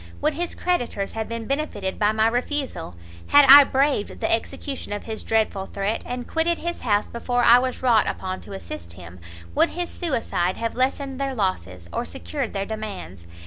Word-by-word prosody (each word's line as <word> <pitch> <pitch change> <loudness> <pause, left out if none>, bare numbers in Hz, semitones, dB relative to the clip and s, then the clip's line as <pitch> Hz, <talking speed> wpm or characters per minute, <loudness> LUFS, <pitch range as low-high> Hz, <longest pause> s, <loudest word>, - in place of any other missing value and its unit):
would 305 - +1
his 345 +3 -3
creditors 245 - -1
have 220 -1 -4
been 230 -1 -4
benefitted 275 -9 -3
by 210 0 +3
my 220 0 +2
refusal? 245 - -2 0.3
had 290 0 +7
I 285 +1 +12
braved 270 -5 0
the - - +1
execution 260 +2 -3
of 205 - -4
his 220 -1 -5
dreadful 215 -3 0
threat, 200 +2 -2
and 245 0 -5
quitted 330 +1 +1
his 345 +1 -4
house 205 -3 +1
before 245 +1 -1
I 240 +1 +8
was 255 0 -3
wrought 235 -4 +4
upon 185 0 -4
to - - -10
assist 85 - -8
him, 85 0 -12 0.3
would - - +3
his 350 0 -4
suicide 230 - -1
have 230 0 -2
lessened 270 +1 -1
their 270 -1 -2
losses, 90 - -2
or - - -1
secured 85 +1 -5
their 195 0 -2
demands? 200 - -7
225 Hz, 185 wpm, -23 LUFS, 195-270 Hz, 0.3 s, I